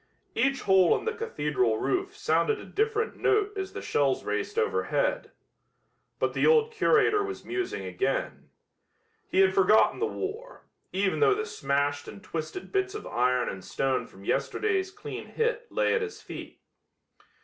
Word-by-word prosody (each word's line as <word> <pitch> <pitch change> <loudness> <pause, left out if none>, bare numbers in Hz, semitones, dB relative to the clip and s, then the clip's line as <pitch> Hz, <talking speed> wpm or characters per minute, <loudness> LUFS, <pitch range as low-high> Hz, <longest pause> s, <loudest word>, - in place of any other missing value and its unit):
Each 270 +4 +1
hole 190 -3 +5
in - - -8
the 455 - 0
cathedral 145 - 0
roof 385 - -1
sounded 440 -1 +1
a - - -9
different 440 +2 -1
note 415 0 +1
as 385 -1 -4
the - - -6
shells - - +1
raced 420 - -3
overhead. - - 0 0.9
But - - 0
the - - +2
old 460 -1 +4
curator 430 -2 +3
was 395 -1 -6
musing 370 +1 -3
again. - - -2 0.8
He 190 - +3
had 190 0 +4
forgotten 195 +3 +4
the - - +1
war, 450 +6 -6 0.3
even 190 +1 0
though 415 -2 +5
the 435 +1 -2
smashed 145 - -1
and 200 - -10
twisted 165 - -6
bits 390 0 0
of 425 - -6
iron 125 +1 +1
and 95 -1 -5
stone 135 +4 -1
from 95 +1 -15
yesterday's 380 - 0
clean 415 +2 -8
hit 480 +1 -2
lay - - +2
at 470 - +1
his 445 -1 -5
feet. - - -9
390 Hz, 160 wpm, -28 LUFS, -, 0.9 s, hole